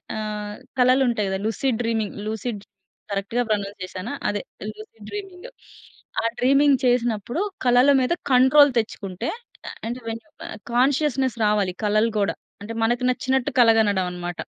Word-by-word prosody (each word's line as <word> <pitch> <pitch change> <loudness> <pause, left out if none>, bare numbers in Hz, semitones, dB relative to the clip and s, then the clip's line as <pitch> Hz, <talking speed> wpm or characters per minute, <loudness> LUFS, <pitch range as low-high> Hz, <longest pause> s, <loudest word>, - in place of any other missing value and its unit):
ఆహ్, 210 -1 -4 0.2
కలలుంటాయి 250 -4 +3
కదా! 190 0 -2
Lucid 225 +2 0
dreaming 225 -3 -1
lucid 220 0 -3
dreaming 190 -3 -37
కరెక్ట్‌గా 200 +5 -1
ప్రొనౌన్స్ 205 -1 -2
చేశానా? 185 +6 -6
అదే 205 -1 -1 0.3
లూసిడ్ 215 0 -13
డ్రీమింగ్. 390 0 -7 0.7
ఆ - - -3
డ్రీమింగ్ 275 +2 +4
చేసినప్పుడు 240 - +1 0.2
కలల 245 +2 +5
మీద 255 +6 +1 0.2
కంట్రోల్ 265 +3 +6
తెచ్చుకుంటే, 205 -1 -4 0.6
అంటే 245 +2 -4
వెన్ 225 0 -5 0.5
కాన్షియస్‌నెస్ 260 -1 +2
రావాలి 205 -3 +1
కలలు 215 +2 +2
కూడా. 200 - 0 0.3
అంటే 225 +3 -6
మనకి 240 +2 +1
నచ్చినట్టు 265 +2 0
కల 235 -2 +7
గనడం 200 -4 +2
అనమాట. 175 -1 -6
230 Hz, 130 wpm, -23 LUFS, 210-255 Hz, 0.7 s, కల